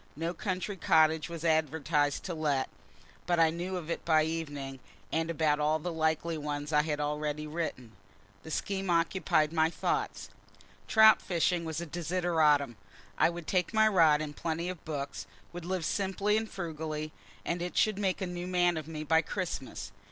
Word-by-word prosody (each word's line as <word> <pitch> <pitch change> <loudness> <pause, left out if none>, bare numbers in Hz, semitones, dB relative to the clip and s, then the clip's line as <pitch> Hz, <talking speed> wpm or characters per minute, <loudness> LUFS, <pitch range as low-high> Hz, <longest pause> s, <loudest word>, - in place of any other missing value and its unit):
No 165 +3 -2
country 185 +2 -3
cottage 160 -1 +3
was 170 -1 -6
advertised 150 -2 +1
to 180 - -4
let 150 -4 0 0.6
but 175 -1 +2
I 165 -1 +5
knew 180 +3 -3
of 170 -2 -5
it - - -3
by 155 -2 +4
evening, 145 -4 -4 0.3
and 165 +1 0
about 155 -2 +1
all 150 +1 +2
the 170 +2 -4
likely 160 0 0
ones 145 0 -4
I 150 - +5
had 150 -1 -2
already 150 0 -2
written. 150 -7 -4 0.5
The - - -10
scheme 195 +3 -2
occupied 165 -2 +2
my 160 -1 +3
thoughts. - - -2 0.6
Trout 220 0 +7
fishing 175 -1 0
was 160 0 -3
a - - -4
desideratum. 160 - +1 0.4
I - - +5
would 170 -1 -7
take 180 +7 0
my 220 0 +6
rod 165 -7 +5
and 145 -1 -7
plenty 170 +1 -2
of 185 -3 -7
books, 145 -3 -5 0.3
would 175 -1 -7
live 185 -2 -2
simply 200 +3 0
and 220 0 -1
frugally, 155 -3 -4 0.3
and 170 0 -2
it 175 0 -4
should 215 -2 +3
make 195 -2 0
a - - 0
new 175 0 -5
man 175 -2 +2
of 155 -1 -5
me 155 -1 -5
by 160 +1 +4
Christmas. 170 -5 -5
160 Hz, 175 wpm, -30 LUFS, 150-175 Hz, 0.6 s, Trout